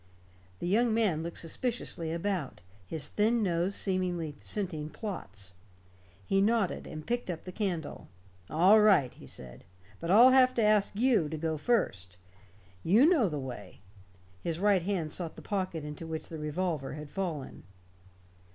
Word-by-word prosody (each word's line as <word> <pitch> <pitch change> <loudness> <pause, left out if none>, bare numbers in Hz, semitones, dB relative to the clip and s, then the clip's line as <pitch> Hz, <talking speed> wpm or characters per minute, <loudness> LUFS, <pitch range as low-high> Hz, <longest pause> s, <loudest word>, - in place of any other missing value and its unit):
The 175 - -4
young 220 +4 +3
man 200 -9 +2
looked 170 +1 -4
suspiciously 170 -3 -2
about, 170 -3 -2 0.3
his 160 -3 -3
thin 225 +2 +1
nose 180 +1 0
seemingly 180 -5 -1
scenting 170 -7 -3
plots. 105 - -6 0.7
He 195 - +2
nodded, 215 -2 +1
and 155 -1 -8
picked 240 -3 -2
up 170 -3 -4
the 185 - -7
candle. 180 -6 -3 0.4
"All 185 +7 +6
right," 195 -12 +4
he - - -14
said. - - -9 0.4
"But 165 - -5
I'll 235 +7 +8
have 255 -1 +5
to 230 - +2
ask 210 -1 +3
you 225 - +3
to 160 - -4
go 160 0 -1
first. 100 - -1 0.6
You 215 - +5
know 295 - +4
the 150 - -3
way." 125 -8 -8 0.6
His 165 -1 -2
right 200 -2 +3
hand 170 -4 -2
sought 170 -3 -4
the - - -11
pocket 185 -6 -3
into 150 +2 -7
which 160 -1 -5
the 160 - -6
revolver 150 -2 -2
had 150 0 -8
fallen. 170 -8 -4
175 Hz, 155 wpm, -30 LUFS, 155-210 Hz, 0.7 s, I'll